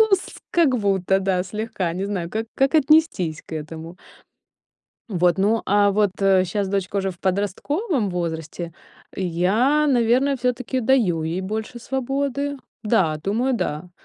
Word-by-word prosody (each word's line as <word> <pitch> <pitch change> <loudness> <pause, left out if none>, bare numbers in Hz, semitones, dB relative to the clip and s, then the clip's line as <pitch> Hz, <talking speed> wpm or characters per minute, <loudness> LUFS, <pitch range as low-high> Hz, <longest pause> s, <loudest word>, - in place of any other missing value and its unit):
Ну 440 - +7
с 375 - 0
как 315 -7 +3
будто, 195 -3 +1
да, 190 -2 +1
слегка, 195 -3 -3
не 190 +2 -2
знаю, 185 -4 -3
как 220 +3 -3
как 270 +3 +2
отнестись 300 - +3
к - - -7
этому. 160 +3 -8 1.1
Вот, 180 -3 +2
ну, 210 +4 +2
а, 205 0 +4
вот, 205 -1 +2
э, 190 -1 +4
щас 195 +3 -2
дочка 195 0 -2
уже 195 -1 0
в 175 - -12
подростковом 205 - -1
возрасте. 170 -1 -4 0.4
Я, 205 - +2
наверное, 260 +2 +3
всё-таки 250 +1 -1
даю 220 -10 +2
ей 165 +3 -2
больше 220 +5 -4
свободы. 275 +3 -2 0.3
Да, 190 -8 +2
думаю 235 +7 0
да. 165 -5 -3
205 Hz, 145 wpm, -22 LUFS, 180-255 Hz, 1.1 s, Ну